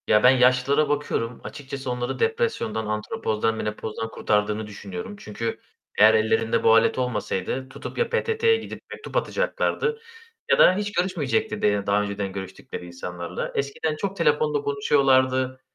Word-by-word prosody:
Ya, 105 0 +4
ben 125 - +9
yaşlılara 130 +3 +3
bakıyorum, 125 -5 -2
açıkçası 135 -2 -6
onları 125 0 -3
depresyondan, 455 - 0
andropozdan, 110 - -1
menopozdan 110 +1 -4
kurtardığını 105 +1 0
düşünüyorum. 210 - -7
Çünkü 115 +2 -4 0.4
eğer 110 +1 +8
ellerinde 110 +1 +2
bu 115 - +6
alet 115 - +3
olmasaydı 125 0 -2
tutup - - -8
ya 475 -1 +1
PTT'ye 460 -1 +2
gidip - - -8
mektup - - -5
atacaklardı 460 -2 0 0.5
ya - - +4
da 185 - +7
hiç 205 +1 -2
görüşmeyecekti 185 +4 -1
de 105 -1 +1
daha 100 +1 +3
önceden 100 -1 -3
görüştükleri 95 -2 -7
insanlarla. 85 0 -6
Eskiden 140 +3 -1
çok 195 +5 -3
telefonla 455 - +2
konuşuyorlardı, 130 - +2
130 Hz, 135 wpm, -24 LUFS, -, 0.5 s, ben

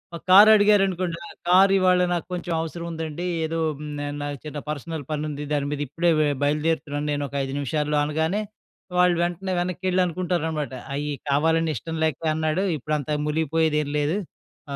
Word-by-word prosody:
ఒక 165 - -8
కార్ 205 +3 +9
అడిగారనుకోండి. 195 -5 +3
ఆ - - -11 0.2
కార్ 190 +2 +6
ఇవాళ 185 -1 +4
నాకు 175 - -2
కొంచెం 175 -1 -3
అవసరం 170 +1 -5
ఉందండి. 160 +1 -5 0.2
ఏదో 165 +1 -2 0.2
హ్మ్. 150 -1 -6 0.2
నాకు 145 -1 -4
చిన్న 150 -1 -5
పర్సనల్ 155 +1 -4
పనుంది. 150 -1 -3
దాని 145 -1 0
మీద 145 0 -3
ఇప్పుడే 170 +5 0
వె 155 - +3 0.2
బయలుదేరుతున్నాను 150 0 0
నేను 145 0 -1
ఒక 140 - -10
5 135 0 -4
నిమిషాల్లో 150 +2 -1
అనగానే, 160 +7 0 0.6
వాళ్ళు 180 -1 +4
వెంటనే 175 +2 -3
వెనక్కేళ్ళి 185 +1 0
అనుకుంటారన్నమాట. 160 -5 -2 0.2
అయ్యి 150 +1 -2 0.2
కావాలని 160 +3 +2
ఇష్టం 165 +8 -5
లేక 160 - -1 0.2
అన్నాడు 155 +4 0
ఇప్పుడు 150 +3 -2
అంత 145 - -8 0.2
ములిగిపోయేది 160 0 +1
ఏం 145 - -6
లేదు. 150 +6 0 0.6
ఆ! - - -2
160 Hz, 165 wpm, -24 LUFS, 150-175 Hz, 0.6 s, కార్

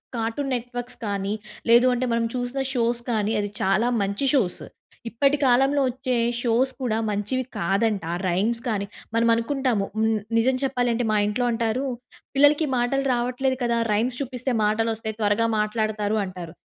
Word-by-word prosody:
Cartoon 230 +5 -2
networks 245 0 -4
కానీ 200 0 -2 0.4
లేదు 240 +2 +7
అంటే 250 +1 -1
మనం 230 0 +1
చూసిన 245 +2 -3
షోస్ 235 -1 +1
కానీ 215 -1 0
అది 205 0 -2
చాలా 215 +5 +2
మంచి 200 +6 -1
షోస్. 210 -10 +1 0.5
ఇప్పటి 275 +5 +2
కాలంలో 270 +3 +4
వచ్చే 255 0 -2 0.2
షోస్ 245 +2 +2
కూడా 225 -3 0
మంచివి 210 +6 -1
కాదంట. 195 +2 0
ఆ - - -1
రైమ్స్ 220 +7 0
కానీ, 205 -3 -1 0.3
మనం 230 0 +3
అనుకుంటాము. 235 -3 0
హ్మ్, 220 -1 +2 0.2
నిజం 255 +3 +3
చెప్పాలంటే 245 -3 0
మా 210 - +2
ఇంట్లో 245 +4 0
అంటారు 230 +3 -1 0.5
"పిల్లలకి 290 +3 +4
మాటలు 245 +3 +1
రావట్లేదు 250 +2 0
కదా, 235 -1 +1 0.2
రైమ్స్ 245 +5 0
చూపిస్తే 255 -1 -2
మాటలొస్తాయి. 220 0 -1
త్వరగా 210 +2 +2
మాట్లాడతారు" 215 0 0
అంటారు. 180 -3 -8
235 Hz, 150 wpm, -24 LUFS, 215-255 Hz, 0.5 s, లేదు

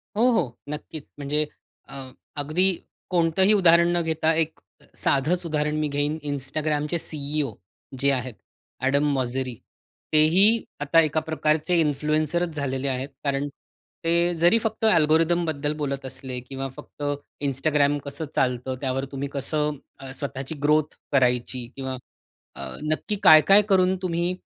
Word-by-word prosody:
हो, 240 +4 +4
हो. 130 - 0
नक्कीच. 150 0 -7
म्हणजे 150 +2 0 0.4
अ, - - -10 0.4
अगदी 155 +7 +2 0.4
कोणतंही 180 +3 +3
उदाहरण 170 -3 +5
न - - +2
घेता 160 0 +1
एक 160 -1 -1 0.2
अ, - - -21
साधंच 170 +6 +1
उदाहरण 150 -1 -1
मी 150 - 0
घेईन, 145 +2 -1
Instagramचे 150 +3 -1
C-E-O, 145 -5 -2 0.5
जे 140 - +3
आहेत, 130 -2 -2 0.5
एडम 140 +2 +2
मोसेरी. 130 -1 -2 0.6
तेही 155 +5 +5 0.4
आता 145 +3 +3
एका 155 0 +1
प्रकारचे 160 +2 0
इन्फ्लुएन्सरचं 155 +3 0
झालेले 140 -2 -3
आहेत. 130 +1 -2
कारण 140 0 -1 0.6
ते 170 +1 +2
जरी 175 +7 +6
फक्त 225 0 -2
अल्गोरिथमबद्दल 160 -4 +2
बोलत 140 -2 -3
असले 130 -1 -6
किंवा 135 +2 -6
फक्त 145 - -10 0.4
Instagram 145 +1 +1
कसं 140 +3 -5
चालतं. 130 0 0
त्यावर 135 0 -1
तुम्ही 140 +1 -3
कसं 150 +1 -2 0.2
अ, 135 -1 -8
स्वतःची 135 +2 -4
ग्रोथ 150 0 +2 0.2
करायची 125 -2 +1
किंवा 130 -1 -4 0.6
अ, - - -7
नक्की 155 +7 -1
काय, 155 -1 +9
काय 200 +2 +8
करून 185 -1 +4
तुम्ही 175 0 -1
150 Hz, 135 wpm, -24 LUFS, 135-165 Hz, 0.6 s, काय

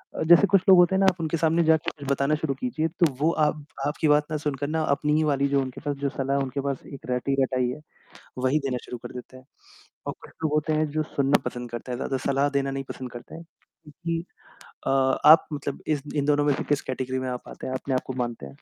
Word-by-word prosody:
अ, - - -1
जैसे 175 +4 +7
कुछ 195 -2 +4
लोग 185 - +9
होते 180 +2 +5
हैं - - +2
ना 195 - +4
आप 180 - -5
उनके 160 +1 -1
सामने 165 +2 +2
जाके 160 -1 +2
कुछ 140 -2 -6
बताना 140 +2 +2
शुरू 150 -2 -2
कीजिए, 195 -11 -1
तो 170 +2 +1
वो 160 +3 +3
आप 150 -2 0 0.2
आपकी 150 +1 0
बात 150 0 +4
ना 155 - 0
सुनकर 145 -1 -3
ना 160 +1 -1
अपनी 150 +1 0
ही 155 - +3
वाली 140 -2 +2
जो 140 -1 +2
उनके 130 -1 -6
पास 145 -2 -2
जो 140 - +2
सलाह 135 +1 -1
उनके 135 +1 -3
पास 135 -2 -3
एक 135 - -9
रट्टी-रटाई 130 0 +1
है, 140 - -5 0.6
वही 130 +4 +2
देना 125 -2 -1
शुरू 125 - -7
कर - - -8
देते 125 +1 -9
हैं। 130 - -15 0.6
और - - -2
कुछ - - -12
लोग 150 - +1
होते 155 +1 +1
हैं 155 0 +2
जो 155 +1 0
सुनना 140 -2 +1
पसंद 120 -1 -5
करते 120 +1 -6
हैं - - -2
ज़्यादा 135 - -2
सलाह 140 +1 +2
देना 135 0 -1
नहीं 135 0 -4
पसंद 130 -1 -6
करते 120 - -10
हैं, 165 - -8 0.4
क्योंकि 165 +3 -4 0.6
अ, - - +2
आप 135 +4 +5
मतलब 140 -1 -4
इस 150 -3 0
इन 140 - +1
दोनों 145 0 +3
में 145 -2 +3
से - - -3
किस 145 -1 +1
कैटेगरी 130 0 -3
में 130 - -3
आप 125 - -6
आते - - -8
हैं, 130 - -4
आपने 130 0 -2
आपको 130 0 -2
मानते 120 - -3
हैं? - - -8
145 Hz, 250 wpm, -25 LUFS, 130-155 Hz, 0.6 s, लोग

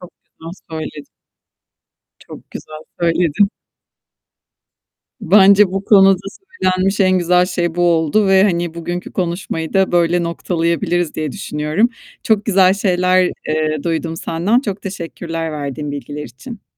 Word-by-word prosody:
Çok 180 - -12
güzel 165 +1 -12 0.2
söyledin. 155 -2 -6 1.1
Çok - - -12
güzel 155 0 -9 0.2
söyledin. 170 +3 +2 1.7
Bence 200 0 +6
bu 195 +1 -3
konuda 195 -3 +5 0.4
söylenmiş 185 +2 +1
en 185 -1 +3
güzel 180 +1 +3
şey 175 -2 -2
bu 175 - -1
oldu 170 +4 +2
ve, 190 0 +5
hani, 175 -4 0
bugünkü 175 +2 -5
konuşmayı 170 -3 -3
da 190 -2 +2
böyle 175 0 +2
noktalayabiliriz 170 0 -1
diye 155 -3 -3
düşünüyorum. 150 +10 -1 0.3
Çok 215 -2 +1
güzel 190 -2 +4
şeyler, 185 -2 +2 0.2
eee 155 -1 -1
duydum 165 -1 -2
senden. 185 +10 0
Çok 205 -6 -5
teşekkürler 165 -3 -5
verdiğin 145 0 -5
bilgiler 145 +1 -6
için. 140 - -11
175 Hz, 125 wpm, -17 LUFS, 160-190 Hz, 1.7 s, Bence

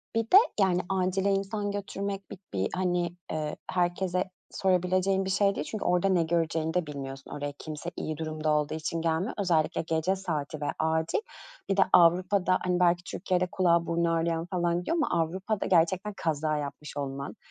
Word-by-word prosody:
Bir 225 - +3
de, 360 - +6 0.2
yani, 185 -2 +3
acile 190 +1 +1
insan 205 +1 -1
götürmek 200 0 -4
bir 195 - -8
bir, 95 0 0
hani, 180 -2 0 0.2
eee, 155 -1 -2 0.2
herkese 180 0 0 0.3
sorabileceğin 185 +1 +1
bir - - -2
şey 200 +1 +2
değil 145 - -3
çünkü 215 - -4
orada 180 +2 +3
ne 180 -3 +3
göreceğini 165 -1 0
de 180 -2 +1
bilmiyorsun. 135 -2 -7
Oraya 145 0 -4
kimse 155 +2 -6
iyi 155 -1 -3
durumda 155 -1 -2
olduğu 150 0 +1
için 160 +1 -3
gelmiyor. 165 +7 0
Özellikle 170 -6 +1
gece 160 +3 0
saati 155 -6 -4
ve - - -1
acil. 160 - +1 0.5
Bir 195 - +1
de - - +6
Avrupa'da, 180 +2 +5
hani, 180 -1 +1
belki 175 0 +3
Türkiye'de 180 -1 -1
kulağı, 170 -2 +3
burnu 170 0 +1
ağrıyan 165 0 0
falan 175 -2 0
gidiyor 330 - -1
ama 180 - +1
Avrupa'da 190 +5 -3
gerçekten 185 +4 +2
kaza 155 -1 0
yapmış 145 0 -6
olman 140 0 -4
175 Hz, 170 wpm, -28 LUFS, 160-190 Hz, 0.5 s, de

